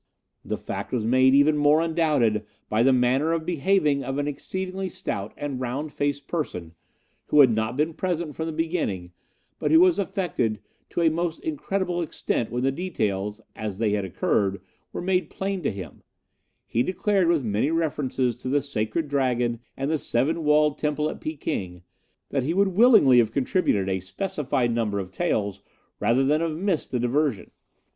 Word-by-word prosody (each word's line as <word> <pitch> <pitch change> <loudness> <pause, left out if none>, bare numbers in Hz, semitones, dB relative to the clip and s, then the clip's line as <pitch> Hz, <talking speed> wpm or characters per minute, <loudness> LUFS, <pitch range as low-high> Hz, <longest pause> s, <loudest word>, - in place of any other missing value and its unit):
The - - -3
fact - - -6
was 120 -4 -1
made 130 +3 +4
even 145 +2 +5
more 145 +1 +4
undoubted 155 -10 +1 0.3
by 110 +1 +2
the 135 +3 +5
manner 130 +5 +2
of 165 -1 -2
behaving 155 -4 +1
of 135 +1 -3
an 145 0 -1
exceedingly 190 +6 -4
stout 100 - -4
and 140 -3 -4
round 135 +5 -3
faced 145 -1 -2
person, 90 - -4 0.5
who 150 - +3
had 130 -4 +6
not 110 +3 -1
been 155 +2 +1
present 170 -3 -2
from 160 - -3
the - - -2
beginning, 155 - -2 0.5
but - - 0
who 320 - +6
was 360 - +5
affected 160 - -1 0.3
to - - -2
a 165 -1 +4
most 170 0 -2
incredible 195 - -2
extent 135 -7 -2
when 120 +2 -2
the 135 - +2
details, 105 - -2
as 105 -3 -5
they 110 -1 +1
had 105 -1 0
occurred, 95 +1 0 0.3
were - - -5
made 185 0 +1
plain 195 -1 -3
to 145 - 0
him, 95 -2 -9 0.6
he 115 - 0
declaring, 190 - +1
with 165 -5 +2
many 110 +5 0
references 145 -6 0
to 130 - -5
the 145 +1 +1
Sacred 140 +3 -2
Dragon 125 -4 0 0.2
and 135 +3 -1
the 160 - +1
Seven 155 +8 0
Walled 150 0 +3
Temple 150 0 0
at - - -10
Peking, 95 - -4 0.5
that 135 - 0
he 155 +7 -1
would 200 0 +3
willingly 195 - +6
have 115 -2 +2
contributed 125 - +1
a 95 -1 0
specified 120 - -1
number 110 -3 -1
of 95 -2 -4
taels 100 - -1 0.4
rather 125 +3 +2
than 150 +4 +2
have 160 -2 -2
missed 185 -2 -1
the 125 - -1
diversion. 125 - 0
145 Hz, 175 wpm, -25 LUFS, 115-165 Hz, 0.6 s, had